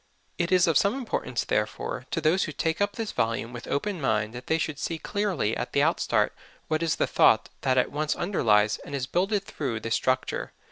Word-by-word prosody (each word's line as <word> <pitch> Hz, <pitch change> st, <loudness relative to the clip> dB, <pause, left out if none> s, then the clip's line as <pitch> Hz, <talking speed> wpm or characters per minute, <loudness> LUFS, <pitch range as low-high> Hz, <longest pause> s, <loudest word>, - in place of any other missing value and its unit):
It 170 Hz, +1 st, 0 dB
is 185 Hz, -1 st, +5 dB
of 165 Hz, -5 st, +4 dB
some 200 Hz, +4 st, +2 dB
importance, 265 Hz, -3 st, -2 dB
therefore, -, -, -2 dB
to 165 Hz, -, -1 dB
those 165 Hz, +4 st, +2 dB
who 155 Hz, -, -5 dB
take 160 Hz, +4 st, -1 dB
up 205 Hz, 0 st, +1 dB
this 225 Hz, -2 st, -4 dB
volume 115 Hz, +1 st, -1 dB
with 120 Hz, -, -8 dB
open 185 Hz, +3 st, -2 dB
mind 110 Hz, -4 st, 0 dB
that 125 Hz, +1 st, -9 dB
they 160 Hz, -, +2 dB
should 155 Hz, -3 st, -3 dB
see 165 Hz, -, -2 dB
clearly 185 Hz, -, -1 dB
at -, -, -4 dB
the -, -, +3 dB
out -, -, +2 dB
start -, -, +1 dB, 0.3 s
what 155 Hz, 0 st, 0 dB
is 165 Hz, -2 st, +1 dB
the -, -, +1 dB
thought -, -, +4 dB
that 130 Hz, -1 st, +1 dB
at 125 Hz, -, +2 dB
once 150 Hz, +1 st, -1 dB
underlies 110 Hz, -, +2 dB
and 140 Hz, -, -7 dB
is 130 Hz, -2 st, -1 dB
builded 195 Hz, +7 st, 0 dB
through 130 Hz, -, -3 dB
this 115 Hz, +1 st, -2 dB
structure. 130 Hz, 0 st, -1 dB
155 Hz, 220 wpm, -27 LUFS, 125-185 Hz, 0.3 s, is